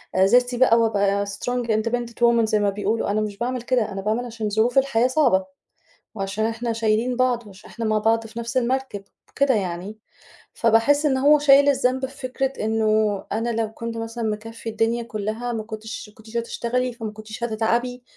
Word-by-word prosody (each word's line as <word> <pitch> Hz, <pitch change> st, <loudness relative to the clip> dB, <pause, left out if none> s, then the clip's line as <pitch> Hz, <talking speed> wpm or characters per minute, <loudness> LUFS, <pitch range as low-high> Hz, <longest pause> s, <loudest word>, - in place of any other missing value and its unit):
آآ 190 Hz, 0 st, +5 dB
ذاتي 245 Hz, +4 st, +3 dB
بقى 240 Hz, -2 st, +5 dB
وأبقى 200 Hz, -2 st, +1 dB
strong 240 Hz, +4 st, -3 dB
independent 230 Hz, +2 st, -1 dB
woman 235 Hz, -1 st, +4 dB
زي 215 Hz, -1 st, +1 dB
ما 205 Hz, -1 st, +2 dB
بيقولوا، 205 Hz, +1 st, -1 dB
أنا 215 Hz, -, +1 dB
مش 210 Hz, -2 st, -4 dB
باعمل 245 Hz, +1 st, -2 dB
كده، 240 Hz, -4 st, 0 dB
أنا 195 Hz, -, -4 dB
باعمل 220 Hz, +5 st, -1 dB
عشان 225 Hz, -3 st, -4 dB
ظروف 220 Hz, +5 st, +1 dB
الحياة 265 Hz, -3 st, +3 dB
صعبة، 255 Hz, -9 st, +2 dB, 0.7 s
وعشان 200 Hz, +1 st, -2 dB
إحنا 230 Hz, +1 st, -2 dB
شايلين 225 Hz, +2 st, 0 dB
بعض 245 Hz, -3 st, +1 dB
وعشان 195 Hz, 0 st, -14 dB
إحنا 230 Hz, -1 st, -5 dB
مع 215 Hz, 0 st, +2 dB
بعض 225 Hz, +1 st, +1 dB
في 225 Hz, +1 st, -8 dB
نَفس 235 Hz, +2 st, -3 dB
المركِب 255 Hz, -4 st, -1 dB, 0.3 s
وكده 275 Hz, -1 st, +2 dB
يعني، 190 Hz, +2 st, -4 dB, 0.5 s
فباحس 235 Hz, +7 st, +3 dB
إن 265 Hz, -3 st, +2 dB
هو 295 Hz, +3 st, +5 dB
شايل 285 Hz, 0 st, +6 dB
الذنب 260 Hz, -1 st, +1 dB
في 270 Hz, +2 st, -11 dB
فكرة 265 Hz, +1 st, -2 dB
إنه 215 Hz, -2 st, +1 dB
أنا 225 Hz, +3 st, -1 dB
لو 225 Hz, -1 st, -1 dB
كنت 230 Hz, 0 st, -5 dB
مثلًا 225 Hz, +1 st, -5 dB
مكفّي 225 Hz, +1 st, -4 dB
الدنيا 225 Hz, +2 st, 0 dB
كلّها 220 Hz, +2 st, -4 dB
ما 220 Hz, -, -3 dB
كنتش 220 Hz, +1 st, -7 dB
ما 210 Hz, -, -22 dB
كنتيش 220 Hz, +1 st, -8 dB
هتشتغلي، 240 Hz, +2 st, -2 dB
فما 225 Hz, -3 st, -6 dB
كنتيش 215 Hz, +2 st, -9 dB
هتتعَبي، 235 Hz, +2 st, -1 dB
230 Hz, 185 wpm, -23 LUFS, 215-245 Hz, 0.7 s, شايل